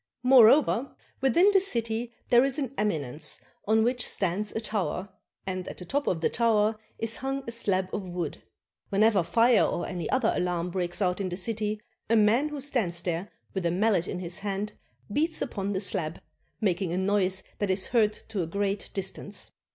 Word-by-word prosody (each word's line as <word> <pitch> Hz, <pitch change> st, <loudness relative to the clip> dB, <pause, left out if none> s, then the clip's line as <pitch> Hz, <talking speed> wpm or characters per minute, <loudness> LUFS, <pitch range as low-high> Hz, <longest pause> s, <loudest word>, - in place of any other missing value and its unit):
Moreover, 255 Hz, +1 st, +5 dB, 0.3 s
within 340 Hz, -, +5 dB
the 390 Hz, -, +7 dB
city 235 Hz, -, -2 dB, 0.2 s
there 240 Hz, +1 st, +7 dB
is 275 Hz, 0 st, +2 dB
an 270 Hz, -4 st, -3 dB
eminence 155 Hz, -, -2 dB, 0.3 s
on 220 Hz, +1 st, +4 dB
which 245 Hz, 0 st, 0 dB
stands 195 Hz, +2 st, -1 dB
a -, -, -2 dB
tower, 200 Hz, -4 st, -2 dB, 0.4 s
and 185 Hz, -1 st, -4 dB
at -, -, -7 dB
the 180 Hz, -, -8 dB
top 285 Hz, +6 st, -1 dB
of 165 Hz, -3 st, 0 dB
the -, -, +2 dB
tower 220 Hz, -2 st, +2 dB, 0.2 s
is 225 Hz, 0 st, -1 dB
hung 270 Hz, +1 st, -3 dB
a -, -, -3 dB
slab 195 Hz, -5 st, 0 dB
of 190 Hz, -3 st, -4 dB
wood. 175 Hz, -4 st, -4 dB, 0.5 s
Whenever 205 Hz, 0 st, +4 dB
fire 230 Hz, +6 st, +4 dB
or 175 Hz, -, -1 dB
any 175 Hz, -4 st, -4 dB
other 260 Hz, -4 st, +2 dB
alarm 180 Hz, -1 st, -1 dB
breaks 180 Hz, +1 st, -1 dB
out 180 Hz, +1 st, 0 dB
in 190 Hz, -, -2 dB
the 175 Hz, -, -4 dB
city, 210 Hz, +1 st, -1 dB, 0.3 s
a 230 Hz, -, +4 dB
man 225 Hz, +7 st, +4 dB
who 300 Hz, -1 st, -5 dB
stands 215 Hz, -12 st, 0 dB
there 175 Hz, +3 st, -2 dB, 0.2 s
with 190 Hz, -, -2 dB
a 170 Hz, -, +2 dB
mallet 190 Hz, 0 st, +2 dB
in -, -, -3 dB
his 175 Hz, -1 st, -4 dB
hand 205 Hz, +1 st, -3 dB, 0.4 s
beats 315 Hz, +5 st, +1 dB
upon 200 Hz, -7 st, -3 dB
the 190 Hz, -, -1 dB
slab, 175 Hz, -5 st, -1 dB, 0.4 s
making 185 Hz, -3 st, 0 dB
a 175 Hz, -, -1 dB
noise 190 Hz, -1 st, +1 dB, 0.2 s
that 205 Hz, -, 0 dB
is 190 Hz, 0 st, +1 dB
heard 220 Hz, -3 st, +3 dB
to 210 Hz, -2 st, -5 dB
a 165 Hz, -, -2 dB
great 200 Hz, +3 st, -2 dB
distance. 200 Hz, +1 st, -3 dB
205 Hz, 190 wpm, -28 LUFS, 185-230 Hz, 0.5 s, the